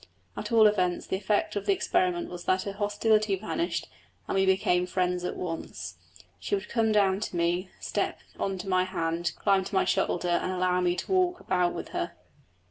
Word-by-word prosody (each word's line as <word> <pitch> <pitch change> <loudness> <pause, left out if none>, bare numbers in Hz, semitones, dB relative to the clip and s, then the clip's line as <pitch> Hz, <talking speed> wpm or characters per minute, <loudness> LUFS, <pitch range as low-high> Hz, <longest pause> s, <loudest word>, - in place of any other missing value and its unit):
At - - -5
all 225 -2 +6
events 185 -4 +2
the - - -2
effect 205 +2 0
of 205 0 -3
the 200 - +5
experiment 180 -2 +1
was 175 -1 -8
that 185 0 +2
her 200 - -3
hostility 210 0 +2
vanished, 270 - -2 0.4
and - - -2
we 190 0 +2
became 180 -1 +2
friends 180 -1 0
at 180 - -3
once. 95 - -5 0.4
She 90 - -1
would 195 +1 -5
come 225 -2 +2
down 195 -2 +3
to 210 - -4
me, 175 +2 0
step - - -2 0.2
on 195 -1 -1
to 185 +2 -7
my 185 -1 +3
hand, 170 -2 -2
climb 195 -2 +3
to 195 - -6
my - - +3
shoulder, 175 0 0
and 185 - -2
allow 180 0 +1
me 175 -1 +2
to - - -5
walk 365 -1 +2
about 180 -1 +1
with - - -6
her. - - -3
185 Hz, 200 wpm, -28 LUFS, 180-205 Hz, 0.4 s, all